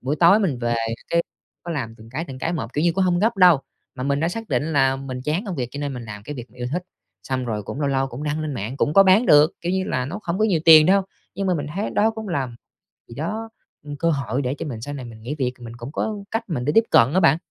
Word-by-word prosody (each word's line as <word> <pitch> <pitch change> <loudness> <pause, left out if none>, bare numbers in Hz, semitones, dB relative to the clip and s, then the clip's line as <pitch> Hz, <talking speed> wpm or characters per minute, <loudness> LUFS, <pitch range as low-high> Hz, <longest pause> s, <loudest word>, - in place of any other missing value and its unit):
Buổi 135 +4 -2
tối 175 +6 +6
mình 175 - 0
về 120 -1 0 0.3
cái, 170 0 +2 0.4
có 170 - -6
làm 130 -8 -3
từng 110 0 -15
cái, 155 +7 -3
từng 135 -4 -9
cái 165 - -2
một, 130 -8 -4
kiểu 150 +4 0
như, 170 - +3
cũng 190 +3 +1
hông 175 -1 +2
gấp 220 +3 +1
đâu, 180 -6 +6 0.3
mà 125 - -6
mình 140 +1 0
đã 165 - +1
xác 225 +5 -6
định 155 +2 -1
là 135 -2 +3
mình 135 -1 -6
chán 155 - -1
công 190 -4 -4
việc 125 -2 -2
cho 145 - -5
nên 140 -2 -3
mình 120 -2 -7
làm 105 -2 -8
cái 145 +7 -7
việc 125 -2 -9
mình 125 - -20
yêu 125 - -2
thích. 180 +3 -1 0.4
Xong 130 +2 -2
rồi 110 -3 -3
cũng 135 - -6
lâu 140 - +1
lâu 135 0 +1
cũng 130 +2 -8
đăng 150 +1 -2
lên 155 -2 -3
mạng, 115 +3 -4
cũng 145 - +1
có 195 - +9
bán 195 +5 +5
được, 150 +2 +6
kiểu 175 +1 -2
như 190 0 0
là, 130 -7 -1
nó 165 +11 -5
không 180 -3 -3
có 215 - +3
nhiều 185 -7 +2
tiền 155 -2 +9
đâu, 195 +2 +4 0.3
nhưng 195 +2 -2
mà 185 - +2
mình 145 -3 -3
thấy 200 +3 -2
đó 215 +2 +2
cũng 220 -1 -7
làm 130 -8 -2 0.5
gì 115 - -11
đó, 215 - -4 0.3
ừm, 145 -1 -7
cơ 165 +3 +1
hội 135 -3 -1
để 130 0 -2
cho - - -5
mình 120 -7 -6
sau 145 +3 -5
này 130 -3 -6
mình 115 -2 -11
nghỉ 125 +7 -4
việc 130 -4 -1
mình 115 -1 -9
cũng 120 +3 -8
có 215 +7 -2 0.2
cách 225 +1 -1
mình 125 -7 -2
để 150 - +2
tiếp 225 - +7
cận 125 +5 +5
á 185 - +4
bạn. 160 -4 +5
145 Hz, 305 wpm, -22 LUFS, 130-175 Hz, 0.5 s, có